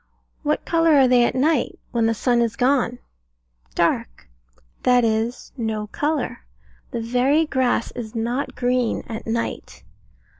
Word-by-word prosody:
What 300 -1 -1
colour 330 -2 +3
are 270 -2 +6
they 250 -1 +5
at - - -1
night, 290 +1 +1
when 230 -1 +1
the 225 - +1
sun 240 +1 +2
is 230 -1 0
gone? 250 -2 +1 0.8
Dark. - - -1 0.5
That 250 -1 +4
is, 225 +2 -1
no 220 -3 -2
colour. 295 -2 -1 0.5
The 235 - -4
very 255 +7 +2
grass 260 -5 0
is 230 -3 -7
not 240 +4 -2
green 250 -1 0
at 225 0 -7
night. 230 +1 -4
245 Hz, 140 wpm, -22 LUFS, 230-270 Hz, 0.8 s, are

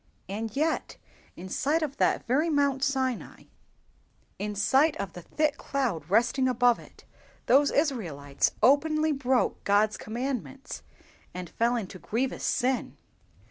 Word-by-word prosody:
And 215 +3 -4
yet, 315 +3 -1 0.4
in 180 - -8
sight 300 - 0
of 280 -2 -4
that - - +1
very 290 +7 +2
Mount 280 -3 +1
Sinai, 265 -4 -1 1.0
in 210 +1 -3
sight 270 +9 +3
of 195 -3 -5
the 175 - -8
thick 300 - 0
cloud 215 - -2
resting 240 +6 +3
above 245 -1 +3
it, - - -16 0.4
those 280 +3 +5
Israelites 170 - 0
openly 310 +5 +4
broke 265 -3 0
God's 205 +1 +2
commandments, 260 +4 -5 0.5
and 180 -2 -6
fell 235 +1 +1
into 195 -5 -5
grievous 245 +9 -2
sin! 255 -1 0
255 Hz, 130 wpm, -28 LUFS, 210-280 Hz, 1.0 s, those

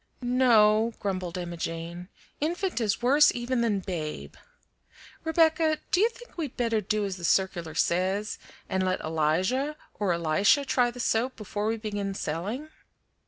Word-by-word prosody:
"No," 230 -3 +4
grumbled 185 -3 -3
Emma 175 -1 -5
Jane; 170 +2 -5 0.3
"infant 345 0 -1
is 215 +1 0
worse 290 +4 +6
even 240 0 -1
than 210 -4 +1
babe. 165 -5 -5 0.9
Rebecca, 320 -1 +3
do 385 -2 +3
you 450 - +5
think 485 +1 -15
we'd 295 -6 -4
better 230 -3 +1
do 210 +1 -1
as 195 -2 -4
the 175 - -11
circular 170 -3 +1
says, 190 +6 0 0.3
and 190 0 0
let 185 0 0
Elijah 180 - 0 0.2
or 205 -3 +1
Elisha 175 - +3
try 250 -2 +2
the 245 +1 -10
soap 240 +2 0
before 210 0 -4
we 225 +1 0
begin 205 -3 -3
selling?" 200 - -4
210 Hz, 150 wpm, -27 LUFS, 185-255 Hz, 0.9 s, worse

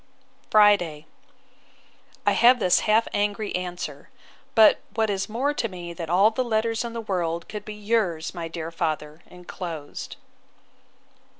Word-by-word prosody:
Friday. 200 -8 +4 1.2
I - - +4
have 245 +2 +6
this 180 -5 +3
half 220 +2 +4
angry 205 0 -1
answer; 180 -1 -5 0.5
but, 220 -2 +7 0.2
what 220 -2 +1
is 195 0 -2
more 260 +7 0
to 240 - -1
me 175 -2 -8
than 165 -1 -6
all 195 +5 +5
the 255 +3 -1
letters 225 -1 0
in 235 -1 -5
the 230 - -4
world 170 -5 -2
could 210 -1 -7
be, 215 - -7
yours, 205 -7 -1
my 170 -2 -5
dear 165 0 -6
father, 155 -1 -3
enclosed. 175 -4 -8
195 Hz, 140 wpm, -25 LUFS, 170-220 Hz, 1.2 s, but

